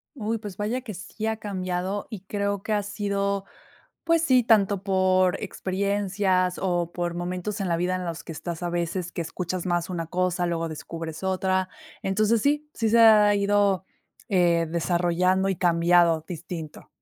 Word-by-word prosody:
Uy, 225 -2 -2
pues 205 -4 -8
vaya 220 +5 -1
que 235 -4 -7
sí 215 +4 -7
ha 220 0 0
cambiado 190 -1 -3
y 210 -4 -7
creo 200 0 -2
que 215 - -1
ha 205 -1 +1
sido, 200 -1 -2 0.6
pues 330 -1 +3
sí, 255 -6 +4
tanto 205 -4 +3
por 185 -2 +2
experiencias 195 -2 0
o 175 -2 0
por 175 -1 -2
momentos 180 +4 -3
en 190 - -1
la 170 - +1
vida 180 +2 0
en 185 - -3
los 170 -1 -5
que 165 - -6
estás 170 +1 -6
a 175 - -2
veces 175 +1 -2
que - - -3
escuchas 180 +2 -4
más 175 -1 0
una 170 -3 -3
cosa 180 0 0
luego 165 -1 -1
descubres 160 +1 -7
otra. 190 0 0 0.3
Entonces 215 +3 +2
sí, 295 +3 +1
sí, 225 -1 0
se 230 +2 +4
ha 215 -2 +7
ido, 200 -2 +2 0.4
eh, 170 -3 +3
desarrollando 175 +3 +1
y 190 - 0
cambiado 170 -2 +3
distinto. 165 -2 -7
185 Hz, 170 wpm, -25 LUFS, 175-205 Hz, 0.6 s, ha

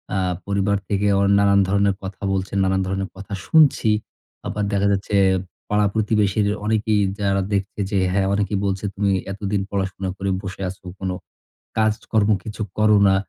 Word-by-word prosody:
আ - - +1 0.3
পরিবার 100 0 +1
থেকে 100 0 0
ও - - +2 0.2
নানান 100 0 +4
ধরনের 100 0 +2
কথা 95 0 -7
বলছেন, 95 +1 -2
নানান 95 0 +1
ধরনের 95 0 -2
কথা 100 +2 -9
শুনছি। 150 -8 +4 0.6
আবার 105 - -2
দেখা 100 0 +2
যাচ্ছে 100 +1 -1 0.5
পাড়া 105 0 +3
প্রতিবেশীর 105 -1 +1 0.2
অনেকেই 110 -1 +1 0.2
যারা 100 -1 +1
দেখছে 100 +1 -2
যে 100 - +1 0.2
হ্যাঁ, 95 -1 +2
অনেকেই 100 -1 0
বলছে, 95 0 -2
"তুমি 100 0 +1 0.2
এতদিন 100 0 -2
পড়াশোনা 95 -1 -2
করে 100 0 -2
বসে 95 -1 -7
আছো। 95 +1 -11 0.2
কোন 95 -1 -2 0.7
কাজ-কর্ম 110 -1 +1
কিছু 110 0 -6 0.2
করো 105 -1 +5
না।" 95 - +4
100 Hz, 160 wpm, -22 LUFS, 95-105 Hz, 0.7 s, করো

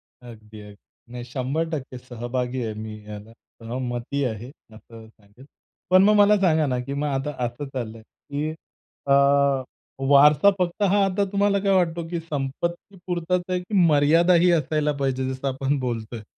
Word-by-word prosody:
अगदी, 110 -3 -15
अगदी. 105 -1 -13 0.4
नाही 125 0 -7
100% 135 +2 -4
सहभागी 125 +1 -4
आहे, 110 -1 -3
मी 110 0 -8
याला 105 +1 -9
सहमती 120 +3 -5
आहे, 115 0 -5 0.2
असं 115 0 -14
सांगेल. 110 +3 -20 0.4
पण 185 +1 +6
मग 210 +2 +5
मला 205 0 +5
सांगा 160 -4 +3
ना, 125 -2 -1
की 125 +3 -5
मग 145 +1 -2
आता 135 +1 -2
असं 120 +4 -5
चाललंय 115 -3 -5
की 145 +6 -6 0.6
अ, 140 - +4 1.0
वारसा 145 +5 +6
फक्त 180 +3 -1
हा 200 +1 +3
आता 195 +1 0
तुम्हाला 200 0 +2
काय 195 0 0
वाटतो 170 -2 0
की 170 0 -3
संपत्तीपुरताच 170 +4 -3
आहे 180 0 0
की 180 +4 -6
मर्यादाही 165 +4 +4
असायला 155 -2 +1
पाहिजे, 130 -1 -1
जसं 130 +1 -5
आपण 135 +2 -1
बोलतोय? 115 -3 -5
140 Hz, 150 wpm, -23 LUFS, 120-170 Hz, 1.0 s, पण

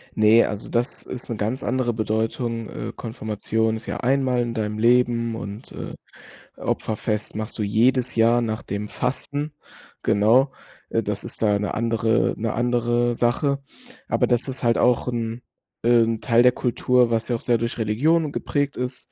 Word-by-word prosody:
Ne, 110 +2 +6
also 105 0 -5
das 120 +1 0
ist 125 0 -6
'ne 115 - -2
ganz 110 +5 -2
andere 120 -1 0
Bedeutung, 115 +1 -2
äh, 115 - -6
Konfirmation 110 -1 -2
ist 110 - -7
ja - - -4
einmal 130 -1 +1
in 120 -1 -2
deinem 105 -1 -2
Leben 115 -1 +3
und, 105 +2 -7
äh, - - -7 0.6
Opferfest 105 -1 -2
machst 110 +2 -4
du - - +1
jedes 125 +5 +2
Jahr 115 +1 +4
nach 110 -1 -3
dem 100 +1 -4
Fasten, 145 +3 -3 0.5
genau. 120 +7 +4 0.4
Äh, 115 - 0
das 100 -1 -3
ist - - -7
da 105 -2 +3
'ne 105 - -2
andere 115 0 +1
'ne 115 0 -2
andere 120 0 +1
Sache. 140 +4 +1 0.5
Aber - - +1
das 120 +2 +1
ist 130 -1 -5
halt 115 -1 +3
auch 125 0 +2
'n 115 0 -3 0.4
äh, 120 0 +5
'n 115 -1 -1
Teil 120 0 +4
der 125 - +7
Kultur, 125 0 +2
was 115 0 0
ja 120 - 0
auch - - -4
sehr 120 -1 +2
durch 115 +1 -3
Religion 145 +9 +1
geprägt 145 -1 -2
ist 125 +1 -4
115 Hz, 175 wpm, -23 LUFS, 110-125 Hz, 0.6 s, der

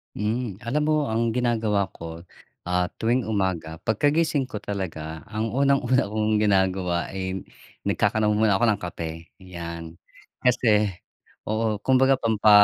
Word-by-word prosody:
Hmm, 105 -1 -2
alam 145 +6 +1
mo 155 -1 +2
ang 115 0 +1
ginagawa 110 -4 +1
ko, 85 +1 -8 0.4
ah, 90 0 +1
tuwing 120 +3 +2
umaga, 95 -6 -1
pagkagising 145 +6 +2
ko 105 - -4
talaga 80 -7 -5
ang 110 +1 -2
unang-una 135 -1 +3
kong 110 0 +1
ginagawa 95 -3 +1
ay 95 0 -4 0.4
nagkakanaw 110 -1 +2
muna 105 -2 +3
ako 120 - +3
ng - - -9
kape, 80 -1 -6
'yan. 85 -3 -7 0.5
Kasi 110 -4 +3 0.6
oo, 110 0 0
kumbaga 130 +3 +3
pampa 110 -3 +3
105 Hz, 130 wpm, -25 LUFS, 90-120 Hz, 0.6 s, unang-una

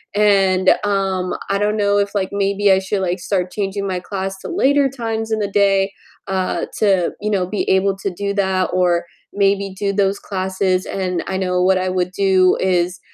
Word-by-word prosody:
and, 195 -3 +4
um, 195 -2 -1 0.2
I 195 - +2
don't 210 +1 0
know 205 -1 +2
if, 200 0 -1
like, 190 -2 0
maybe 200 0 +1
I 190 - +5
should, 195 +1 -2
like, 180 0 -1
start 180 0 -2
changing 200 -1 -3
my 185 -1 -2
class 195 +1 -5
to - - -8
later 285 -5 +2
times 225 -3 -4
in 220 - +1
the 205 - -1
day, 195 -1 +2 0.4
uh, 190 -1 -1
to, 195 -5 +2
you 210 - -1
know, 190 -3 +1
be 205 +2 -3
able 190 +1 +2
to 195 0 -3
do 200 +3 -3
that, 190 -2 +1
or 175 -1 +2 0.3
maybe 200 0 +1
do 200 +1 -1
those 200 0 +1
classes, 185 -1 -1
and 185 -2 -2
I 190 - -2
know 180 -1 0
what 190 +1 +3
I 185 0 -1
would 180 -1 -1
do 190 -1 +3
is 180 -1 0
195 Hz, 195 wpm, -19 LUFS, 185-200 Hz, 0.4 s, I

